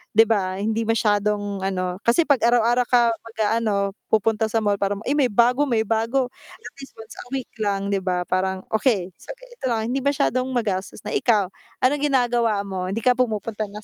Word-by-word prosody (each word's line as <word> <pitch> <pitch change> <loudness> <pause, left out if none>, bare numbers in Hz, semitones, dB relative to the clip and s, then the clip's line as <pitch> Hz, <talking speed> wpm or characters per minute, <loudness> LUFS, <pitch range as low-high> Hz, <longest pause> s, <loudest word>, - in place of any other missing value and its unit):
'di 225 - +8
ba, 190 -3 0
hindi 220 +2 -1
masyadong 205 -2 0
ano, 185 -1 -2
kasi 240 +8 +4
'pag 285 -5 +2
araw-araw 240 +1 +3
ka 240 -2 +4
mag-aano, 215 -3 -1 0.2
pupunta 220 0 +1
sa 225 +1 0
mall 205 -1 +1
para 200 0 0
ma 210 - -9
“Ay, - - +1
may 275 -4 +3
bago, 245 +6 +3
may 225 -3 +1
bago.” 230 +4 0 0.2
At - - -11
least, 270 - -11
once 225 0 -12
a - - -9
week 260 -3 -5
lang, 200 -1 -1
'di 195 - +1
ba. 180 -1 -1
Parang, 190 0 -1
okay, 215 -5 +1
so - - -9
ganito - - -18
lang, 225 -1 -1
hindi 270 - 0
masyadong 260 -2 0
magastos 205 -7 -3
na 210 - -5
ikaw, 205 -6 +1 0.3
anong 290 +3 +2
ginagawa 240 -5 +1
mo, 190 -2 -4
hindi 210 +4 -3
ka 250 - +5
pumupunta 220 -3 -2
na 210 +1 -10
220 Hz, 195 wpm, -22 LUFS, 200-245 Hz, 0.3 s, di